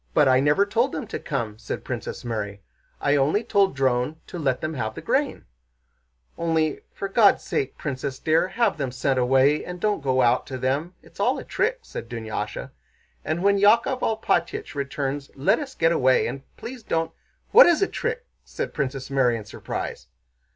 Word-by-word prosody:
"But 150 - +5
I 130 0 +5
never 145 +8 +3
told 235 +6 +1
them 260 - -3
to 220 - -5
come," 115 -7 -3
said 110 - -5
Princess - - -5
Mary. 105 -4 -4 0.4
"I 145 - +2
only 150 +10 +2
told 200 -7 +2
Dron 130 +2 +1
to 175 - -7
let 135 -5 0
them 155 0 -3
have 110 -6 -3
the - - -6
grain." - - 0 0.9
"Only, 160 -2 +1
for 200 - -4
God's 200 +1 +4
sake, 135 -1 -2
Princess 135 -1 -4
dear, 160 +5 +2
have 215 -5 0
them 135 -3 -2
sent 130 +1 0
away 135 +4 +3
and 180 0 -7
don't 210 -2 0
go 130 -2 +2
out 120 +1 +2
to 130 - -5
them. 140 +8 -1
It's - - -19
all - - +2
a - - -6
trick," 470 +5 -1
said 115 - -8
Dunyásha, 110 -3 -5 0.5
"and 165 +3 -2
when 200 0 +4
Yákov 230 +5 +4
Alpátych 215 -6 0
returns 140 0 -3
let 135 - +2
us 270 -3 -7
get 165 0 +3
away... 130 -5 +3
and 135 - -4 0.2
please 250 0 -8
don't..." 165 -6 -1 0.4
"What - - +9
is 345 +2 +4
a - - +2
trick?" 475 +1 -3 0.2
asked - - -5
Princess 135 0 -3
Mary 125 -4 +3
in 110 - -8
surprise. - - -6
145 Hz, 185 wpm, -24 LUFS, 130-200 Hz, 0.9 s, What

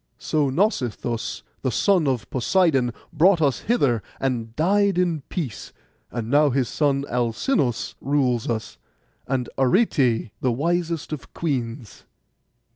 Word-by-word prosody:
So 150 -3 0
Nausithous, 125 - -1 0.2
the 130 - 0
son 175 - +2
of 125 -5 -1
Poseidon, 135 -2 +2 0.2
brought 175 +3 +5
us 140 -6 +2
hither, 140 - +1 0.2
and 120 -4 -2
died 200 +3 +2
in 175 -4 +1
peace; 145 - -5 0.4
and 115 -2 -4
now 145 +4 +4
his 130 -2 +1
son 140 -2 0
Alcinous 120 - 0
rules 130 -4 +1
us, 110 -2 -4 0.5
and 130 -2 -1
Arete 130 - +2
the 130 - +2
wisest 165 +4 -1
of 135 -8 -8
queens. 125 -7 -4
135 Hz, 120 wpm, -23 LUFS, 120-165 Hz, 0.5 s, brought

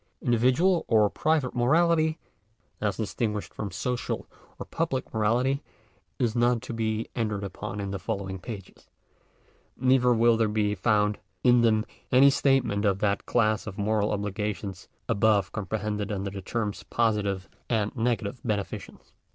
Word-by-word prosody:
Individual 130 +10 +3
or 110 -2 +4
private 155 -5 +1
morality, 160 +5 +3 0.6
as 105 -2 0
distinguished 105 -1 -2
from 105 - -4
social 125 +7 -3 0.3
or - - -6
public 150 -6 -2
morality, 120 +6 +1 0.6
is 120 -2 0
not 120 0 +3
to - - -6
be 110 -1 -1
entered 105 -4 -1
upon 100 +1 -5
in 100 -1 -3
the 100 - -3
following 95 +1 -4
pages. 100 -1 -9 0.9
Neither 130 -1 +4
will 115 0 +4
there 110 -1 +2
be 105 -1 +1
found 105 +1 +1 0.2
in 125 -1 +6
them 110 -1 +3 0.3
any 135 +2 +7
statement 135 -7 +2
of 100 -2 +2
that 100 -1 0
class 110 -2 +1
of 100 - -6
moral 105 0 +1
obligations 105 -2 -3 0.2
above 100 -2 +2
comprehended 105 0 -3
under 100 -1 -3
the 100 -1 -6
terms 105 +1 -3
positive 105 -5 0 0.2
and 110 -3 0
negative 115 -1 -1
beneficenoe*. 105 -4 -4
110 Hz, 140 wpm, -27 LUFS, 100-120 Hz, 0.9 s, any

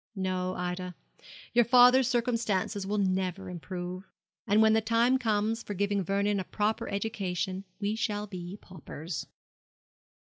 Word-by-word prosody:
No, 185 -1 -2
Ida, 180 0 -4 0.6
your 240 0 +6
father's 250 +1 +6
circumstances 230 -5 0
will 210 +1 -1
never 190 -1 -1
improve; 180 +1 -6 0.4
and 205 +2 +4
when 220 0 +6
the 220 - +3
time 230 +4 +3
comes 220 -1 0
for 205 - -6
giving 200 +1 0
Vernon 200 +2 +1
a - - -2
proper 220 +4 -1
education 195 -2 -2
we 205 +1 -1
shall 210 -2 -1
be 185 -1 -7
paupers.' 165 -2 -7
200 Hz, 135 wpm, -29 LUFS, 185-220 Hz, 0.6 s, your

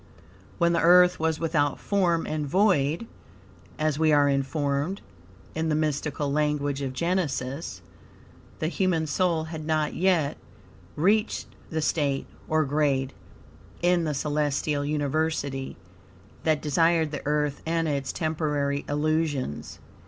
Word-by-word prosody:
When 170 0 +3
the 170 - +2
Earth 180 +1 +6
was 160 0 0
without 150 -4 +1
form 175 -5 +1
and 150 -1 -2
void," 180 0 +2 0.7
as 155 -1 0
we 160 -1 +4
are 145 -1 +5
informed 140 +5 0 0.5
in 160 0 -1
the 155 - +2
mystical 150 -1 -1
language 145 -1 0
of 135 -2 -2
Genesis, 150 -3 -2 0.7
the 155 - -1
human 175 -2 +1
soul 165 +1 +1
had 160 -1 -6
not 155 -1 0
yet 170 -6 +1 0.6
reached 210 +7 +2 0.2
the 160 -1 -2
state, 140 -4 0 0.2
or 155 -1 +2
grade, 140 -2 +1 0.7
in 175 -1 +3
the 150 -2 -1
celestial 145 0 0
university 145 -2 -1 0.7
that 155 -2 +2
desired 160 +1 +2
the 145 - -4
Earth 150 -1 0
and 165 0 +1
its 140 -3 -1
temporary 150 -3 -1
illusions. 150 - -1
155 Hz, 125 wpm, -26 LUFS, 145-165 Hz, 0.7 s, Earth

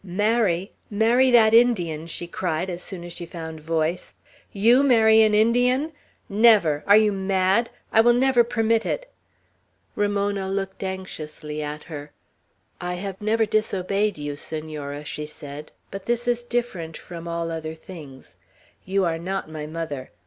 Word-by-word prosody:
"Marry! 200 -1 +1 0.2
Marry 230 +5 +3
that 225 -3 +6
Indian!" 175 -10 +3
she 170 +1 -5
cried, 175 +1 -2
as 175 0 -6
soon 180 -2 -7
as 175 0 -8
she 175 -1 -7
found 160 -2 -7
voice. 160 +2 -2 0.4
"You 230 +6 +4
marry 225 -5 +5
an 215 -1 +4
Indian? 245 +7 +3 0.4
Never! 200 -8 +4
Are 205 +1 +8
you 215 -1 +4
mad? 195 +3 +1 0.2
I 225 - +6
will 240 +1 +5
never 255 -1 +4
permit 230 -1 +1
it." - - -4 0.8
Ramona 200 -1 0
looked 195 0 -3
anxiously 155 -5 -6
at 150 0 -5
her. 145 -2 -9 0.7
"I 180 0 -3
have 195 +1 -6
never 220 +2 +2
disobeyed 205 -1 0
you, 145 -1 -4
Senora," 150 -1 -6
she 150 +1 -5
said, 150 0 -9 0.2
"but 195 -1 -8
this 240 0 -1
is 240 0 +1
different 235 -10 -3
from 170 -1 -9
all 170 0 -3
other 160 -1 -5
things; 145 - -12 0.5
you 195 0 +1
are 165 -1 -1
not 185 -1 -4
my 150 -1 -6
mother. 155 -5 -5
190 Hz, 150 wpm, -24 LUFS, 160-220 Hz, 0.8 s, Are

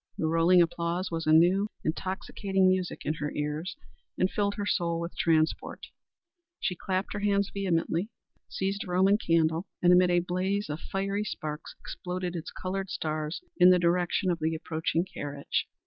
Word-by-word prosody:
The - - -1
rolling 165 +2 +5
applause 170 +2 -2
was 165 -1 -3
a - - +4
new, 180 +6 +5 0.2
intoxicating 190 +3 0
music 185 -1 0
in 155 - +1
her 145 0 -2
ears, 150 +4 -3 0.4
and 185 - +2
filled 200 -1 0
her 205 -1 -3
soul 170 -4 0
with 170 +1 -5
transport. 160 -1 0 0.7
She 180 - -1
clapped 185 +2 -2
her 205 - -3
hands 200 -1 +1
vehemently; 180 0 0 0.4
seized 195 +2 -2
a - - -11
roman 190 +3 +3
candle, 165 0 +1
and 180 0 +5
amid 180 0 +5
a 175 0 +4
blaze 185 +1 -1
of 150 - -4
fiery 195 +3 -2
sparks 155 -6 -6
exploded 180 0 -5
its 165 0 -5
colored 190 +1 -4
stars 155 0 -3 0.2
in 180 0 +8
the 180 - +7
direction 175 +1 +1
of 170 - -2
the 160 +1 0
approaching 160 +1 -1
carriage. 145 -5 -3
180 Hz, 165 wpm, -28 LUFS, 165-190 Hz, 0.7 s, in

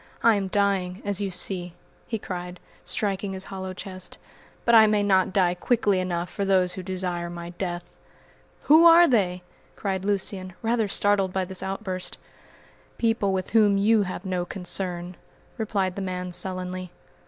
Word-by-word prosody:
I 230 - +6
am 200 -2 -1
dying, 195 -1 0
as 205 0 -1
you 200 - -1
see," 180 -1 0 0.3
he 225 - -2
cried, 180 -3 -6 0.2
striking 195 -1 -2
his 190 0 -4
hollow 190 -1 -5
chest, 185 0 -8 0.5
"but 235 - +3
I 220 -1 +8
may 210 -1 +2
not 190 -2 +3
die 185 -3 +2
quickly 205 +1 +1
enough 175 -1 -2
for 200 - -4
those 185 -2 +3
who 185 - -6
desire 180 -2 -3
my 170 0 -7
death." 175 -1 -5 0.7
"Who 320 +3 +7
are 340 +1 +8
they?" 185 - +1 0.3
cried 190 -2 -3
Lucian, 195 -2 -2
rather 225 -1 +1
startled 200 -1 +2
by 190 0 -1
this 190 0 -3
outburst. 190 -1 -4 0.8
"People 225 -4 +1
with 190 -1 -2
whom 210 -3 +4
you 215 +2 +4
have 185 0 -4
no 185 -2 -1
concern," 180 -1 -2 0.4
replied 200 -4 -1
the 200 - -4
man 180 -1 -4
sullenly. 185 0 -2
190 Hz, 160 wpm, -25 LUFS, 180-205 Hz, 0.8 s, I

